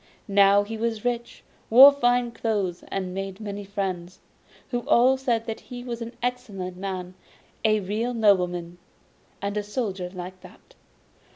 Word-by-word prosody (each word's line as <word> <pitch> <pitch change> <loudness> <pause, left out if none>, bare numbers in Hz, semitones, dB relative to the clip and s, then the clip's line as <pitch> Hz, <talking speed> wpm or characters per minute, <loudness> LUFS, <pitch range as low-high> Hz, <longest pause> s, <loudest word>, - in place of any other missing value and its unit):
Now 200 0 +5
he 220 +2 -6
was 230 -1 -2
rich, 240 -1 -3 0.3
wore 265 +5 +10
fine 245 -3 +1
clothes, 205 -7 -2
and 185 -2 -3
made 195 0 -5
many 205 -1 -5
friends, 190 -3 -4 0.5
who 245 - 0
all 255 +3 +5
said 240 -4 -1
that 225 - -4
he 245 -1 -9
was 240 -1 -5
an 230 +1 -6
excellent 210 -8 -3
man, 185 -1 -5 0.5
a 215 -1 +3
real 220 +6 -2
nobleman. 180 -5 +1 0.6
And 200 +1 -2
the 210 - 0
Soldier 205 -4 -3
liked 185 0 -8
that. - - -17
205 Hz, 150 wpm, -25 LUFS, 190-235 Hz, 0.6 s, wore